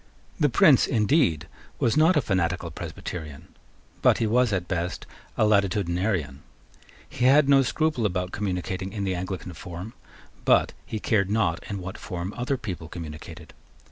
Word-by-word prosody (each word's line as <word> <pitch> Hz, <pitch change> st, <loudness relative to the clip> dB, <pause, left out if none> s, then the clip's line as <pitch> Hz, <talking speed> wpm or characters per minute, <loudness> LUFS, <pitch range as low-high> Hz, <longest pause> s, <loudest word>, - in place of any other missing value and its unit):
The -, -, +3 dB
Prince, -, -, +5 dB
indeed, 105 Hz, -, +2 dB, 0.3 s
was 115 Hz, -, +1 dB
not 160 Hz, +3 st, +5 dB
a -, -, +4 dB
fanatical 95 Hz, -6 st, -1 dB
Presbyterian; 75 Hz, -5 st, -7 dB, 0.5 s
but -, -, +5 dB
he 115 Hz, -, 0 dB
was 120 Hz, +2 st, +2 dB
at 90 Hz, -3 st, -1 dB
best 90 Hz, 0 st, -3 dB, 0.3 s
a 110 Hz, -, +4 dB
Latitudinarian. 95 Hz, -7 st, +1 dB, 0.7 s
He 125 Hz, -, -2 dB
had 140 Hz, +2 st, +6 dB
no 140 Hz, -1 st, +6 dB
scruple 135 Hz, -3 st, 0 dB
about 90 Hz, -1 st, -3 dB
communicating 95 Hz, -1 st, -3 dB
in 100 Hz, -3 st, -3 dB
the 95 Hz, -1 st, 0 dB
Anglican 90 Hz, 0 st, -5 dB
form; 90 Hz, +7 st, -8 dB, 0.5 s
but -, -, +3 dB
he 110 Hz, -, -4 dB
cared 100 Hz, -3 st, +1 dB
not 100 Hz, -5 st, 0 dB
in 100 Hz, -, -3 dB
what 95 Hz, +2 st, -7 dB
form 90 Hz, +1 st, -5 dB
other 125 Hz, +3 st, -1 dB
people 90 Hz, -8 st, -6 dB
communicated. 80 Hz, -1 st, -9 dB
95 Hz, 150 wpm, -25 LUFS, 90-110 Hz, 0.7 s, had